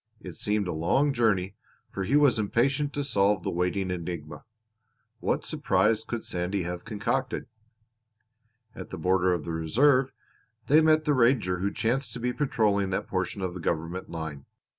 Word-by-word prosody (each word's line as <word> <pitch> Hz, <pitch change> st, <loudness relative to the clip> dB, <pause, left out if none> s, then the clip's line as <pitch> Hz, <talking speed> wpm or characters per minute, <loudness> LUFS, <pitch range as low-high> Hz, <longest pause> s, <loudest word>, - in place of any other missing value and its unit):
It 90 Hz, -5 st, -9 dB
seemed 105 Hz, -2 st, -1 dB
a -, -, -2 dB
long 135 Hz, -, +2 dB
journey 105 Hz, -6 st, +1 dB, 0.4 s
for 95 Hz, -, -3 dB
he 135 Hz, -, +1 dB
was 145 Hz, -6 st, +4 dB
impatient 135 Hz, +7 st, +1 dB
to 145 Hz, -, -2 dB
solve 100 Hz, -7 st, +2 dB
the -, -, -2 dB
waiting 90 Hz, +2 st, -1 dB
enigma. 85 Hz, -3 st, -6 dB, 0.7 s
What -, -, -1 dB
surprise 110 Hz, -1 st, +1 dB
could 115 Hz, 0 st, -5 dB
Sandy 90 Hz, +2 st, -2 dB
have 90 Hz, 0 st, -5 dB
concocted? 115 Hz, +5 st, -2 dB, 1.3 s
At -, -, -9 dB
the -, -, -6 dB
border 95 Hz, 0 st, +2 dB
of 85 Hz, -4 st, -1 dB
the 85 Hz, -, -4 dB
Reserve 125 Hz, -, +3 dB, 0.5 s
they 155 Hz, +3 st, +5 dB
met 155 Hz, 0 st, +4 dB
the 150 Hz, -, +3 dB
ranger 115 Hz, -8 st, +2 dB
who 100 Hz, +2 st, -1 dB
chanced 120 Hz, +1 st, -1 dB
to 125 Hz, -, -6 dB
be 125 Hz, +1 st, -1 dB
patrolling 105 Hz, -9 st, +1 dB
that 95 Hz, -, -2 dB
portion 95 Hz, +1 st, -2 dB
of 90 Hz, -1 st, -2 dB
the 90 Hz, -, -7 dB
government 85 Hz, +2 st, -3 dB
line. 80 Hz, -4 st, -6 dB
100 Hz, 165 wpm, -27 LUFS, 90-125 Hz, 1.3 s, they